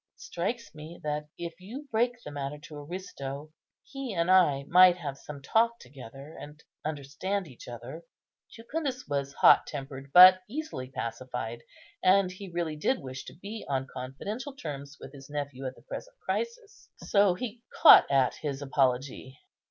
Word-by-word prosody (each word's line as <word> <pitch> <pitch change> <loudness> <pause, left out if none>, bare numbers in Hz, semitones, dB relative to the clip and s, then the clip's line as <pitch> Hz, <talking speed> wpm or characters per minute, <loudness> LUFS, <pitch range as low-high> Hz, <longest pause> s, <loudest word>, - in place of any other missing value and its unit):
It - - -20
strikes 230 0 -4
me 155 +2 -10
that, 150 0 -2
if 170 -1 -5
you 255 +10 -8
break 240 +2 0
the - - -8
matter 145 0 -4
to 150 +1 -11
Aristo, 145 -3 -7 0.3
he 270 -6 -6
and 170 +2 +2
I 150 -7 +5
might 180 0 +7
have 145 -6 -5
some 140 0 -10
talk 230 +8 +2
together, 135 - -12
and 150 +1 -10 0.2
understand 160 +6 -3
each 130 -5 -13
other." 125 +6 -8 0.5
Jucundus 255 +3 -4
was 140 -1 -2
hot - - +6
tempered, 135 -1 -7
but 185 +3 +10
easily 285 - -5
pacified; 120 -2 -5 0.4
and 185 0 +4
he 190 +1 -9
really 170 -3 -3
did 255 - +1
wish 130 0 -8
to - - -10
be 205 +5 -7
on 135 -1 0
confidential 205 - -6
terms 145 - -7
with 135 - -11
his 135 -1 -12
nephew 140 -2 -4
at 130 - -6
the - - -19
present - - -8
crisis; 465 -2 -5
so 200 -3 +3
he 235 +2 -6 0.2
caught - - +10
at 135 -2 +3
his 145 -1 -4
apology. 130 -1 -1
155 Hz, 160 wpm, -29 LUFS, 135-200 Hz, 0.5 s, but